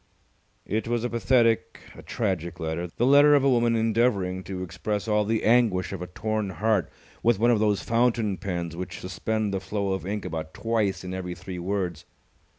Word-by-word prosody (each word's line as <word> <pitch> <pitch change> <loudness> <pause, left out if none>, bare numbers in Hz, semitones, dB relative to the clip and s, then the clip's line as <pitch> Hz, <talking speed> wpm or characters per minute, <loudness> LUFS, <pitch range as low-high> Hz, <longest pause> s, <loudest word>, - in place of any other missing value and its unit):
It 110 +3 -2
was 120 -1 0
a 120 - -2
pathetic, 115 -1 +2 0.2
a - - -11
tragic 90 -5 -3
letter, 80 +1 -3
the 120 - +2
letter 145 +2 +7
of 140 - +3
a 140 - +4
woman 120 -1 +3
endeavouring 110 -5 +1
to 95 -1 -5
express 100 +5 -3
all 105 -1 +2
the 110 +1 0
anguish 110 -6 +3
of 95 - -5
a 90 - -4
torn 110 +2 -2
heart 105 -1 0 0.3
with 120 -2 +3
one 120 +4 +3
of 115 - +3
those 105 -2 +1
fountain 115 -4 +1
pens 85 -4 -4
which 90 0 -6
suspend 105 +3 -2
the 95 - 0
flow 100 +1 -2
of 95 -1 -4
ink 100 -2 -3
about 80 -3 -5
twice 105 -5 -1
in 90 0 -5
every 90 -1 -4
three 90 +1 -7
words. 90 -3 -3
105 Hz, 190 wpm, -26 LUFS, 90-115 Hz, 0.3 s, letter